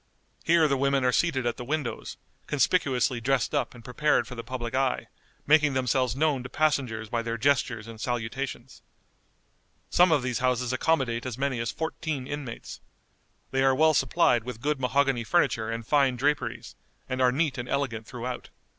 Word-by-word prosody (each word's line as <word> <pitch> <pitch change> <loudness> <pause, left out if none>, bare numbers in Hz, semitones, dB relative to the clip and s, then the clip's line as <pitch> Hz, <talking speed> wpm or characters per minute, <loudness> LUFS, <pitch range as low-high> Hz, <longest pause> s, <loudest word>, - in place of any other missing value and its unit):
Here 165 -1 +4
the 140 -2 +1
women 140 -1 +1
are 125 - +4
seated 135 -3 +1
at 120 - -1
the - - -6
windows, 145 -1 -3 0.3
conspicuously 135 -5 +1
dressed 135 +2 +1
up - - -1
and 115 -2 -14
prepared 150 +5 +1
for - - -8
the 115 -1 -6
public 120 -1 -5
eye, 130 0 0 0.4
making 150 -2 +4
themselves 130 -1 +1
known 145 -2 +1
to 125 - -8
passengers 130 -8 0
by 115 +2 -1
their 115 0 -3
gestures 125 -3 +1
and 115 -1 -10
salutations. 120 +2 -4 1.1
Some 180 0 +5
of 145 -5 +3
these 125 -2 -1
houses 125 -1 0
accommodate 130 -4 0
as 125 -2 -5
many 135 -2 -1
as 115 -1 -2
fourteen 160 -4 -4
inmates. 140 -4 -6 0.7
They 135 - +1
are 135 0 +4
well 155 +3 +4
supplied 130 -7 +3
with 125 -2 -7
good 150 0 0
mahogany 135 -1 +1
furniture 115 -6 +1
and 115 0 -4
fine 135 -1 +3
draperies, 145 +3 -1 0.3
and 130 0 -2
are 125 -1 +5
neat 140 -1 0
and 120 - -5
elegant 120 -6 -2
throughout. 125 0 -6
130 Hz, 170 wpm, -27 LUFS, 120-140 Hz, 1.1 s, Some